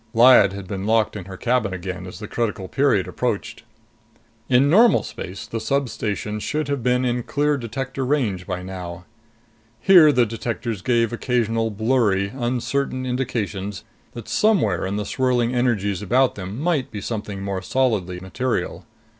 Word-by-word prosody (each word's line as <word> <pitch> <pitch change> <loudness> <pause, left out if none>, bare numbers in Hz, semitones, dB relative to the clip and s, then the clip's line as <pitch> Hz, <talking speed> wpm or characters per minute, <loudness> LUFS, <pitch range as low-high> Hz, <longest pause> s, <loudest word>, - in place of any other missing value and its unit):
Lyad 120 -4 +7
had 100 -1 -7
been 100 0 -4
locked 110 -1 +2
in 100 -4 -6
her 95 -1 -9
cabin 115 -5 0
again 90 0 -6
as 90 - -9
the 105 - -7
critical 105 -4 -2
period 115 -5 +2
approached. - - -3 0.9
In 130 +2 +5
normal 220 +10 +5
space, 95 +3 -7
the 115 - -4
substation 110 -5 -2
should 150 +6 -2
have 140 -2 -1
been 125 +2 +1
in 125 0 0
clear 145 +4 0
detector 135 +2 -4
range 120 -10 -1
by 90 -2 -4
now. 90 -2 -7 0.7
Here, 175 -6 +7
the 125 -4 +3
detectors 115 -1 -4
gave 115 0 +1
occasional 115 -2 0
blurry, 105 -3 +1
uncertain 130 +1 -1
indications 105 -6 -3 0.3
that 120 -3 -8
somewhere 120 - +2
in 100 - -3
the 105 0 -2
swirling 125 0 +1
energies 105 -6 0
about 125 +5 +2
them 100 +3 -6
might 155 -4 0
be 105 - -6
something 105 -2 -5
more 100 -1 -3
solidly 100 -6 0
material. 120 +7 -3
115 Hz, 155 wpm, -22 LUFS, 100-130 Hz, 0.9 s, Lyad